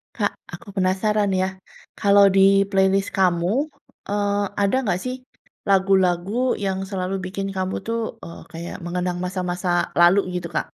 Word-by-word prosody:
Kak, -, -, 0 dB, 0.2 s
aku 235 Hz, -, -10 dB
penasaran, 200 Hz, +3 st, +1 dB
ya, -, -, +2 dB, 0.5 s
kalau 200 Hz, -1 st, +6 dB
di -, -, +5 dB, 0.3 s
playlist 195 Hz, 0 st, +2 dB
kamu, 175 Hz, -2 st, +2 dB, 0.6 s
eee, 205 Hz, 0 st, 0 dB, 0.3 s
ada 200 Hz, +4 st, +2 dB
nggak, 185 Hz, -6 st, 0 dB
sih, 255 Hz, 0 st, -3 dB, 0.5 s
lagu-lagu 190 Hz, -1 st, +2 dB, 0.3 s
yang 190 Hz, -1 st, -1 dB
selalu 190 Hz, -1 st, -3 dB
bikin 195 Hz, +1 st, -4 dB
kamu, 185 Hz, 0 st, -2 dB
tuh, 230 Hz, 0 st, -1 dB, 0.2 s
eee, 170 Hz, -, -9 dB
kayak 170 Hz, +1 st, -7 dB
mengenang 180 Hz, 0 st, -2 dB
masa-masa 180 Hz, 0 st, -3 dB, 0.3 s
lalu, 175 Hz, +3 st, +6 dB, 0.2 s
gitu, 175 Hz, -1 st, -3 dB
Kak, -, -, 0 dB
190 Hz, 140 wpm, -22 LUFS, 180-200 Hz, 0.6 s, kalau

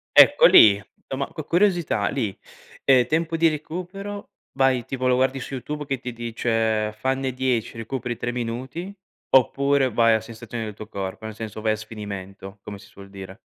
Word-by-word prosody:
Ecco -, -, +8 dB
lì. 105 Hz, -, +8 dB, 0.2 s
Insomma, 135 Hz, +1 st, -5 dB
cu 155 Hz, -, -7 dB
curiosità 175 Hz, -, +1 dB
lì. 100 Hz, -4 st, -3 dB, 0.5 s
Ehm, 130 Hz, -3 st, +5 dB
tempo 165 Hz, +3 st, 0 dB
di 165 Hz, 0 st, +4 dB
recupero 185 Hz, +6 st, -5 dB, 0.2 s
vai 135 Hz, -2 st, +2 dB
tipo 130 Hz, +1 st, -3 dB
lo 125 Hz, -, +4 dB
guardi 130 Hz, +1 st, +1 dB
su 130 Hz, -, -7 dB
YouTube 150 Hz, +3 st, -5 dB
che 135 Hz, -2 st, -2 dB
ti 125 Hz, 0 st, -6 dB
dice: 115 Hz, -2 st, -1 dB
“Fanne 130 Hz, 0 st, -1 dB
10, 125 Hz, -3 st, -1 dB
recuperi 120 Hz, +1 st, -4 dB
3 120 Hz, -, -3 dB
minuti,” 125 Hz, +10 st, -5 dB, 0.4 s
oppure 135 Hz, +1 st, +3 dB
vai 115 Hz, 0 st, +4 dB
a 110 Hz, -, +3 dB
sensazioni 115 Hz, 0 st, -7 dB
del 105 Hz, -, -6 dB
tuo 105 Hz, +1 st, -10 dB
corpo? 95 Hz, 0 st, -6 dB
Nel 110 Hz, -1 st, -6 dB
senso, 110 Hz, -1 st, -7 dB
vai 110 Hz, 0 st, +1 dB
a -, -, -1 dB
sfinimento, 100 Hz, -2 st, -8 dB
come 100 Hz, 0 st, -8 dB
si 100 Hz, -, -16 dB
suol 100 Hz, 0 st, -14 dB
dire. 95 Hz, 0 st, -10 dB
120 Hz, 175 wpm, -23 LUFS, 110-140 Hz, 0.5 s, Ecco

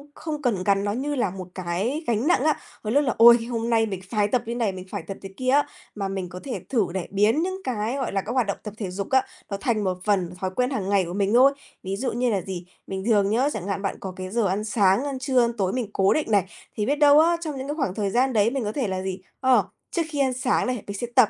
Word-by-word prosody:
không 305 Hz, -2 st, -5 dB
cần 225 Hz, -9 st, 0 dB
gắn 195 Hz, 0 st, +2 dB
nó 205 Hz, -, 0 dB
như 285 Hz, +5 st, -2 dB
là 250 Hz, -7 st, +1 dB
một 185 Hz, -1 st, -7 dB
cái 195 Hz, -, -2 dB
gánh 235 Hz, +3 st, +1 dB
nặng 350 Hz, -6 st, +3 dB
á. 310 Hz, 0 st, +2 dB, 0.2 s
Đôi 215 Hz, -, -2 dB
lúc 290 Hz, +2 st, +4 dB
là, 255 Hz, -, 0 dB
ôi, 235 Hz, +1 st, +9 dB
hôm 230 Hz, 0 st, -2 dB
nay 225 Hz, -1 st, +3 dB
mình 190 Hz, -4 st, -5 dB
phái 210 Hz, -2 st, +1 dB
tập 240 Hz, +3 st, +1 dB
như 235 Hz, +1 st, -3 dB
này, 230 Hz, -4 st, 0 dB
mình 185 Hz, -1 st, -8 dB
phải 200 Hz, -5 st, -4 dB
tập 195 Hz, -, -5 dB
thế 195 Hz, -, -8 dB
kia 255 Hz, 0 st, -1 dB
á, 285 Hz, +2 st, +4 dB, 0.3 s
mà 200 Hz, -2 st, -2 dB
mình 190 Hz, -2 st, -4 dB
có 180 Hz, 0 st, -8 dB
thể 265 Hz, -, -4 dB
thử 225 Hz, -8 st, +2 dB
này 190 Hz, -2 st, -3 dB
biến 210 Hz, +9 st, +3 dB
những 375 Hz, +1 st, -3 dB
cái, 230 Hz, -1 st, -2 dB
gọi 265 Hz, -, -2 dB
là, 195 Hz, -, 0 dB
các 210 Hz, -, -6 dB
hoạt 250 Hz, -3 st, +1 dB
động 200 Hz, -, -2 dB
tập 210 Hz, -, -6 dB
thể 200 Hz, -5 st, -4 dB
dục 195 Hz, +1 st, -4 dB
á, 265 Hz, -1 st, +3 dB, 0.2 s
nó 200 Hz, -, -3 dB
thành 215 Hz, +1 st, 0 dB
một 185 Hz, -2 st, -1 dB
phần 185 Hz, -4 st, +1 dB
thói 185 Hz, -, -1 dB
quen 250 Hz, 0 st, +1 dB
hàng 210 Hz, -9 st, -2 dB
ngày 200 Hz, -2 st, +3 dB
của 170 Hz, -, -6 dB
mình 200 Hz, +1 st, 0 dB
thôi. 265 Hz, +3 st, +6 dB, 0.3 s
Ví 190 Hz, +1 st, -3 dB
dụ 250 Hz, +6 st, -2 dB
như 245 Hz, +1 st, 0 dB
là 200 Hz, -4 st, 0 dB
gì, 180 Hz, -1 st, -6 dB, 0.2 s
bình 190 Hz, 0 st, -4 dB
thường 205 Hz, -4 st, +3 dB
nhớ, 250 Hz, +7 st, +2 dB
chẳng 200 Hz, -3 st, -5 dB
hạn 195 Hz, -1 st, -2 dB
bạn 195 Hz, -, -2 dB
có 190 Hz, -1 st, -6 dB
cái 185 Hz, 0 st, -6 dB
giờ 225 Hz, +1 st, +1 dB
ăn 195 Hz, +3 st, -1 dB
sáng, 210 Hz, 0 st, +3 dB
ăn 275 Hz, -2 st, -3 dB
trưa, 260 Hz, -1 st, +2 dB
ăn 235 Hz, 0 st, +1 dB
tối 190 Hz, -2 st, 0 dB
mình 245 Hz, -5 st, -2 dB
cố 195 Hz, 0 st, +3 dB
định 305 Hz, -7 st, -1 dB
này, 200 Hz, -3 st, +4 dB, 0.3 s
thì 210 Hz, -, -1 dB
biết 285 Hz, -, +2 dB
đâu 295 Hz, 0 st, +6 dB
á 335 Hz, +2 st, +4 dB
trong 305 Hz, -4 st, -4 dB
những 265 Hz, +1 st, -5 dB
cái 295 Hz, -, -2 dB
khoảng 270 Hz, -, -2 dB
thời 205 Hz, -2 st, -1 dB
gian 255 Hz, +5 st, +2 dB
đấy 215 Hz, 0 st, +4 dB
mình 270 Hz, -2 st, -2 dB
có 210 Hz, -, -2 dB
thể 250 Hz, 0 st, -1 dB
là 190 Hz, -1 st, -2 dB
gì, 190 Hz, 0 st, -4 dB, 0.2 s
ờ, 260 Hz, -1 st, +4 dB, 0.3 s
trước 340 Hz, -, 0 dB
khi 295 Hz, -2 st, -4 dB
ăn 265 Hz, -2 st, +2 dB
sáng 255 Hz, 0 st, +1 dB
này 250 Hz, -4 st, -2 dB
mình 200 Hz, 0 st, -5 dB
sẽ 240 Hz, -, -3 dB
tập 255 Hz, -5 st, +6 dB
220 Hz, 300 wpm, -24 LUFS, 195-260 Hz, 0.3 s, ôi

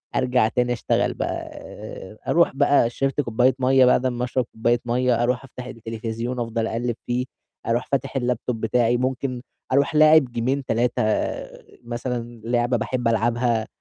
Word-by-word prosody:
أرجع 125 Hz, -3 st, +2 dB
تاني 125 Hz, +1 st, 0 dB
أشتغل 120 Hz, -, 0 dB
بقى، -, -, -2 dB, 0.2 s
آآ، 100 Hz, +3 st, -10 dB
أروح 170 Hz, 0 st, +4 dB
بقى 140 Hz, -4 st, +4 dB
شرِبت 135 Hz, +3 st, -1 dB
كوباية 125 Hz, +1 st, +2 dB
مَيّة، 130 Hz, 0 st, +5 dB
بعد 125 Hz, 0 st, +3 dB
أمّا 125 Hz, -1 st, -1 dB
أشرب 125 Hz, 0 st, -1 dB
كوباية 120 Hz, +2 st, +1 dB
مَيّة، 120 Hz, 0 st, +1 dB
أروح 125 Hz, +2 st, 0 dB
أفتح 125 Hz, -1 st, -9 dB
التلفزيون، 115 Hz, +1 st, -5 dB
أفضل 115 Hz, -1 st, -1 dB
أقلِّب 120 Hz, +1 st, -2 dB
فيه، 125 Hz, +1 st, -1 dB, 0.4 s
أروح 115 Hz, +1 st, 0 dB
فاتح 135 Hz, 0 st, -1 dB
الLaptop 125 Hz, -1 st, -1 dB
بتاعي، 115 Hz, +2 st, +1 dB
ممكن 130 Hz, 0 st, -2 dB, 0.3 s
أروح 140 Hz, +3 st, +2 dB
لاعب 155 Hz, -1 st, +7 dB
جيمين، 125 Hz, +3 st, -2 dB
3 120 Hz, -1 st, 0 dB, 0.8 s
مثلًا، 120 Hz, -1 st, -5 dB
لعبة 120 Hz, +1 st, +1 dB
باحب 125 Hz, +1 st, -2 dB
ألعبها 115 Hz, 0 st, +1 dB
120 Hz, 150 wpm, -23 LUFS, 115-130 Hz, 0.8 s, لاعب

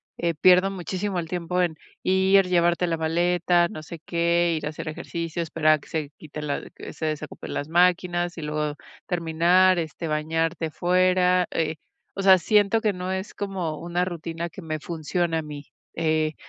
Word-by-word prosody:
eh, 170 Hz, -1 st, -1 dB
pierdo 185 Hz, +4 st, +5 dB
muchísimo 190 Hz, +1 st, -3 dB
el 165 Hz, -, -4 dB
tiempo 180 Hz, +1 st, -1 dB
en 170 Hz, -3 st, 0 dB, 0.3 s
ir, 190 Hz, +1 st, +4 dB
llevarte 175 Hz, 0 st, +2 dB
la 165 Hz, -, 0 dB
maleta, 175 Hz, +2 st, +2 dB
no 155 Hz, -2 st, -8 dB
sé 165 Hz, +1 st, -9 dB
qué, 170 Hz, 0 st, +2 dB
ir 155 Hz, -, -5 dB
a -, -, -1 dB
hacer 155 Hz, +1 st, -7 dB
ejercicio, 165 Hz, +2 st, -4 dB
esperar 155 Hz, -1 st, +3 dB
a 155 Hz, -, +1 dB
que -, -, -18 dB
se 155 Hz, -3 st, -3 dB
quite 155 Hz, -1 st, -8 dB
la 145 Hz, -1 st, -2 dB
que -, -, -9 dB
se 160 Hz, -, -3 dB
desocupen 155 Hz, -1 st, -5 dB
las 145 Hz, -, -3 dB
máquinas 175 Hz, 0 st, +2 dB
y -, -, -5 dB
luego 150 Hz, -1 st, -2 dB, 0.3 s
terminar, 175 Hz, +2 st, +3 dB
este, 165 Hz, 0 st, -4 dB
bañarte 160 Hz, +1 st, -1 dB
fuera, 180 Hz, +1 st, +3 dB
eh, 160 Hz, -1 st, -1 dB, 0.4 s
o 195 Hz, -, -3 dB
sea, 190 Hz, -1 st, +7 dB
siento 205 Hz, +4 st, +3 dB
que 215 Hz, -3 st, +1 dB
no 180 Hz, +1 st, -4 dB
es 190 Hz, +1 st, -4 dB
como 185 Hz, -6 st, -3 dB
una 175 Hz, +1 st, -1 dB
rutina 170 Hz, -1 st, -5 dB
que 175 Hz, +4 st, -10 dB
me 155 Hz, -1 st, -4 dB
funciona 165 Hz, +1 st, -2 dB
a -, -, -2 dB
mí. 150 Hz, -2 st, -8 dB, 0.3 s
Eh, 155 Hz, -1 st, 0 dB
170 Hz, 180 wpm, -25 LUFS, 160-180 Hz, 0.4 s, sea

